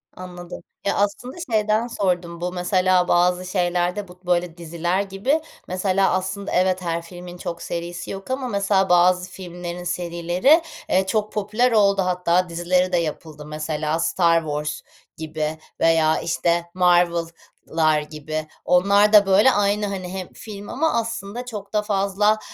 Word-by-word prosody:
Anladım. 180 -1 -9 0.2
Ya, 200 - +1
aslında 205 - -1 0.2
şeyden 215 +1 +2
sordum. 175 -5 -2
Bu 180 - -2
mesela 185 0 +2
bazı 180 +1 +2
şeylerde 180 +1 -1
bu, 180 0 -15
böyle, 175 -1 0
diziler 170 +2 -1
gibi 200 +11 0 0.3
mesela 190 +1 +1
aslında 190 +2 -2
evet, 185 0 +2
her 170 -1 -2
filmin 175 +1 -10
çok 170 -1 -6
serisi 175 +1 -5
yok 195 +6 -7
ama 260 -1 -2
mesela 200 -2 +1
bazı 180 +1 +4
filmlerin 175 -1 -7
serileri, 175 - +2 0.3
eee, 190 +1 +3
çok 215 0 0
popüler 215 +4 +1
oldu, 200 -3 +4
hatta 180 -1 +1
dizileri 180 +2 +1
de 175 - +2
yapıldı. 155 -2 -4
Mesela 155 +1 -2
Star 170 -1 +3
Wars 150 0 -3 0.4
gibi 155 0 -3 0.2
veya, 160 -1 +3
işte, 170 +1 0
Marvel'lar 170 -3 +1
gibi. 155 +1 -5 0.2
Onlar 200 +4 +4
da, 205 -1 +8
böyle, 195 +7 +5
aynı, 205 -1 +1
hani, 185 -2 -5
hem 185 -2 -6
film 205 -2 -9
ama 320 +3 0
aslında 230 0 -3
çok 210 -4 -8
da 210 - +2
fazla, 205 +1 +1
180 Hz, 145 wpm, -22 LUFS, 170-200 Hz, 0.4 s, da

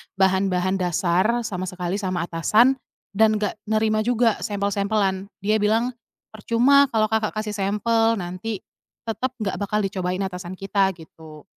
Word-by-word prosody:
bahan-bahan 190 -1 +1
dasar 185 +6 +1
sama 185 -4 -4
sekali 180 +2 -3
sama 185 -3 -2
atasan. 215 +11 +3 0.3
Dan 215 +1 +3
nggak 210 0 -2
nerima 215 0 +1
juga 240 -2 +2
sampel-sampelan." 200 -1 -1 0.2
Dia 215 +1 +2
bilang, 225 +4 +1 0.4
"Percuma 245 +6 +4
kalau 215 -1 +2
Kakak 220 -1 0
kasih 215 0 -3
sampel, 225 +3 +1
nanti 185 +2 -5 0.4
tetap 245 +3 -3
nggak 195 -3 -2
bakal 210 +1 0
dicobain 185 -1 -2
atasan 180 -1 -5
kita," 195 0 +1
gitu. 160 -2 -14
200 Hz, 135 wpm, -23 LUFS, 185-220 Hz, 0.4 s, Percuma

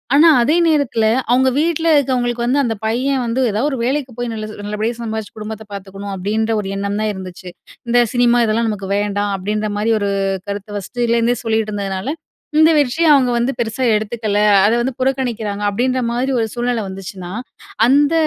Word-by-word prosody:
ஆனா, 325 +3 +7
அதே 305 +6 +2
நேரத்துல 280 -8 +1 0.3
அவுங்க 260 +1 +4
வீட்ல 330 0 0
இருக்கவங்களுக்கு, 245 -3 0
வந்து 280 +3 +2
அந்த 230 -3 -1
பையன் 255 +3 0
வந்து 235 +3 -1
எதா 210 +3 -1
ஒரு 265 - -2
வேலைக்கு 270 0 -1
போய் 245 -1 -2
நல்லது 215 -1 -6
நல்லபடியா 215 +3 -2
சம்பாதிச்சு, 220 -2 -5
குடும்பத்த 220 0 -6
பாத்துக்கணும், 200 0 -7
அப்பிடின்ற 220 +4 -1
ஒரு 195 - -6
எண்ணம் 200 +1 -2
தான் 215 -1 0
இருந்துச்சு. 185 -1 -8 0.4
இந்த 245 +1 +4
சினிமா 245 -1 +3
இதெல்லாம் 225 +1 +1
நமக்கு 195 -2 -4
வேண்டாம், 205 0 -1
அப்பிடின்றமாரி 210 +2 -1
ஒரு 200 - 0 0.4
கருத்த 200 +1 -5
ஃபர்ஸ்ட்டுலேருந்தே 235 +3 0
சொல்லிட்டு 220 -1 0
இருந்ததுனால, 200 +4 -3 0.5
இந்த 320 +1 +6
வெற்றிய 295 +4 +2
அவுங்க 255 -3 +3
வந்து 240 +3 +1
பெருசா 235 +3 -1
எடுத்துக்கல. 215 -1 -1 0.3
அத 215 - +4
வந்து 255 +1 -1
புறக்கணிக்கிறாங்க, 240 -6 -1
அப்பிடின்ற 255 +5 0
மாரி 255 +3 -1
ஒரு 225 - +1
சூழ்நிலை 240 -2 -1
வந்துச்சுன்னா, 190 -1 -8 0.6
அந்த 290 +4 +4
230 Hz, 165 wpm, -18 LUFS, 205-255 Hz, 0.6 s, ஆனா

